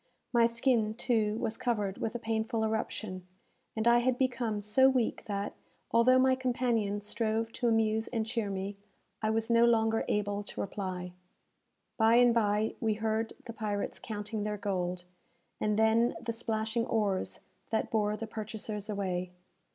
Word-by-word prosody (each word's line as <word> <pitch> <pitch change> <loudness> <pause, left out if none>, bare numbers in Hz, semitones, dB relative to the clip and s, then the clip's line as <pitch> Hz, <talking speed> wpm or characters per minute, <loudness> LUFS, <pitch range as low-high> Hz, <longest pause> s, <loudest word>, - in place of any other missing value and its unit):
My 235 -1 +5
skin, 230 -2 +1
too, 220 -3 +1
was 225 -1 -2
covered 210 -6 -1
with 225 - -2
a - - +1
painful 225 -1 -1
eruption, 215 -4 -3 0.5
and 220 +1 0
I 235 0 +6
had 250 0 +1
become 245 -5 0
so 235 +6 +5
weak 255 -4 0
that, 200 -1 -3 0.4
although 245 +3 +5
my 260 0 +5
companion 240 -5 0
strove 225 +1 -1
to 245 - -1
amuse 220 -1 +2
and 225 -3 -1
cheer 225 -2 -2
me, 195 +1 -4 0.4
I 215 - +1
was 225 +1 0
no 230 0 +6
longer 225 -1 +3
able 205 0 0
to 205 - -8
reply. 185 -2 -4 0.9
By 225 0 +5
and 245 0 +6
bye, 215 -1 +2
we 220 -2 +1
heard 220 +1 -1
the 230 - -7
pirates 210 -3 -3
counting 210 0 -4
their 210 0 -2
gold, 180 -3 -2 0.6
and 210 0 +1
then 225 +2 +3
the 230 -1 -3
splashing 225 0 -1
oars 205 -4 -1 0.3
that 220 - -1
bore 210 -1 +1
the 225 - -4
purchasers 215 -1 -6
away. 185 -3 -2
220 Hz, 160 wpm, -31 LUFS, 210-230 Hz, 0.9 s, I